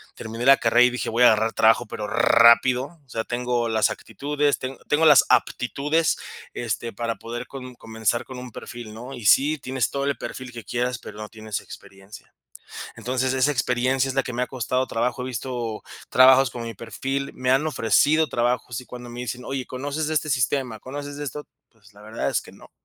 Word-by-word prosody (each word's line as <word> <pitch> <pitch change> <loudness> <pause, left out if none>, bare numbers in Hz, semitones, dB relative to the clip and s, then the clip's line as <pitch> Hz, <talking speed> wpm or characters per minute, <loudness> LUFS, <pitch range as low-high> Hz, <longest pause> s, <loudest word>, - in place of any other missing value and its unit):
Terminé 115 +2 -6
la 135 0 +8
carrera 120 +1 +4
y - - +4
dije, 125 - -3
voy 120 +2 +2
a - - +9
agarrar 110 +1 +3
trabajo, 115 +2 +4
pero 105 -1 -5
rápido. 125 +6 +4
O - - -34
sea, 115 -2 -3
tengo 120 -1 -1
las 110 -1 +2
actitudes, 145 +5 -1
teng 130 +1 -5
tengo 155 +2 +3
las 150 -3 +7
aptitudes, 150 +6 +1 0.4
este, 115 -1 -3
para 115 +1 -3
poder 120 +2 -7
com 130 -2 -9
comenzar 110 0 -2
con 130 -1 -8
un 125 -2 -9
perfil, 115 -2 -9
¿no? 125 +4 -9
Y 115 -4 -8
sí, 150 +7 +5
tienes 130 -1 -1
todo 140 0 -2
el 140 - -1
perfil 130 -1 -7
que 115 -2 -9
quieras, 125 +3 -2
pero - - -11
no 105 0 -7
tienes 110 -2 -5
experiencia. 95 +2 -13 0.6
Entonces, 130 +1 -1
esa 130 +3 +2
experiencia 125 +1 +1
es 130 - -3
la 135 - +2
que 125 - -5
me 125 +1 -2
ha - - 0
costado 130 +1 -1
trabajo. 120 +3 -1
He - - -4
visto 120 -3 -4 0.3
trabajos 130 0 +6
con 120 - -7
mi 115 -1 -6
perfil, 135 +6 -4
me 130 0 -1
han 135 +4 +3
ofrecido 150 +4 +3
trabajos 120 0 -1
y 125 - -14
cuando 125 -1 -9
me 120 +1 -7
dicen, 125 +1 -5
oye: 135 -2 -4
"¿Conoces 145 +4 -3
de 155 - -1
este 155 0 0
sistema? 125 -2 0
¿Conoces 145 +2 -7
de 145 - -5
esto?" 145 +2 -6 0.2
Pues, 105 -2 -23
la 105 - -16
verdad 110 +1 -3
es - - +1
que - - -14
no. - - -16
125 Hz, 210 wpm, -24 LUFS, 115-135 Hz, 0.6 s, a